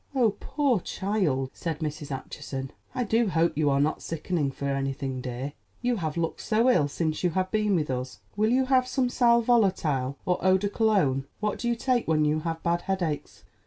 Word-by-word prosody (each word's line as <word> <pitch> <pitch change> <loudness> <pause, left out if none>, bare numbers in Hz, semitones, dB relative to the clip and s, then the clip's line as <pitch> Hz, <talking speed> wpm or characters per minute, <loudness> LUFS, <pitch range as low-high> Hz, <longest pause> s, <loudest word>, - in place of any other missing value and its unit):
"Oh, 240 -5 +4
poor 275 -8 +1
child," 175 -10 -1
said 165 -3 -3
Mrs. 150 -1 -4
Acheson, 135 0 -5 0.2
"I 250 - +1
do 225 0 +2
hope 170 -1 +2
you 150 -1 +2
are 140 0 +2
not 150 +2 +1
sickening 165 -2 -2
for 140 +1 -6
anything, 135 -1 -2
dear. 125 +3 -5 0.3
You 245 -1 +1
have 160 -4 -3
looked 165 -1 -2
so 230 +3 +3
ill 150 -11 +3
since 155 +3 -2
you 180 - +4
have 185 +2 -1
been 210 -2 +2
with 150 -5 0
us. 125 0 -4 0.2
Will 215 +2 +2
you 260 +2 +3
have 255 -1 +3
some 255 -1 0
sal 235 -2 +4
volatile 165 - +2
or 180 - +1
eau 190 0 +5
de 205 +2 -1
Cologne? 190 - +2
What 210 0 -1
do 240 - -2
you 235 - +1
take 245 0 0
when 155 -1 +3
you 150 +1 +2
have 165 0 -4
bad 170 0 +1
headaches?" 175 -6 -3
170 Hz, 200 wpm, -27 LUFS, 145-220 Hz, 0.3 s, eau